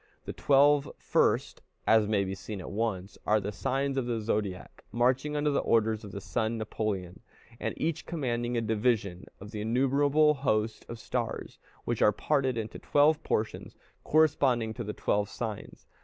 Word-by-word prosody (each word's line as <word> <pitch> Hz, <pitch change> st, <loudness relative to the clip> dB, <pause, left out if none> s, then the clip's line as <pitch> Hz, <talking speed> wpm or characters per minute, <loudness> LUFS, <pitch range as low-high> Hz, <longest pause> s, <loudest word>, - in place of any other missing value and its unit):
The -, -, -5 dB
twelve 145 Hz, 0 st, +4 dB
first, -, -, +1 dB, 0.2 s
as 110 Hz, -1 st, +4 dB
may 105 Hz, -2 st, +2 dB
be 95 Hz, 0 st, -3 dB
seen 100 Hz, +2 st, -7 dB
at 90 Hz, -, -7 dB
once, 100 Hz, -3 st, -3 dB
are 110 Hz, +1 st, +3 dB
the 105 Hz, +1 st, -4 dB
signs 135 Hz, +5 st, -1 dB
of 130 Hz, -2 st, -1 dB
the 115 Hz, -2 st, -1 dB
zodiac, 105 Hz, -4 st, -3 dB
marching 130 Hz, +5 st, +1 dB
under 150 Hz, 0 st, +1 dB
the 140 Hz, -, +2 dB
orders 110 Hz, -1 st, +1 dB
of 100 Hz, -, -8 dB
the 100 Hz, -, -6 dB
sun 110 Hz, +5 st, -2 dB
Napoleon, 100 Hz, -4 st, -3 dB, 0.4 s
and -, -, -3 dB
each 160 Hz, 0 st, -2 dB
commanding 120 Hz, -6 st, -2 dB
a -, -, +1 dB
division 110 Hz, -4 st, 0 dB
of 105 Hz, +2 st, -10 dB
the 105 Hz, -2 st, -5 dB
innumerable 140 Hz, +6 st, +3 dB
host 110 Hz, -6 st, -1 dB
of 115 Hz, -, -6 dB
stars, -, -, -4 dB, 0.3 s
which 120 Hz, -2 st, -2 dB
are 105 Hz, -, +6 dB
parted 130 Hz, +2 st, 0 dB
into 110 Hz, -1 st, -5 dB
twelve 150 Hz, +2 st, +3 dB
portions, 110 Hz, +1 st, -2 dB, 0.3 s
corresponding 140 Hz, -7 st, +2 dB
to 120 Hz, -, -5 dB
the 105 Hz, 0 st, -4 dB
twelve 105 Hz, 0 st, 0 dB
signs. 110 Hz, -4 st, -6 dB
115 Hz, 170 wpm, -29 LUFS, 105-135 Hz, 0.4 s, are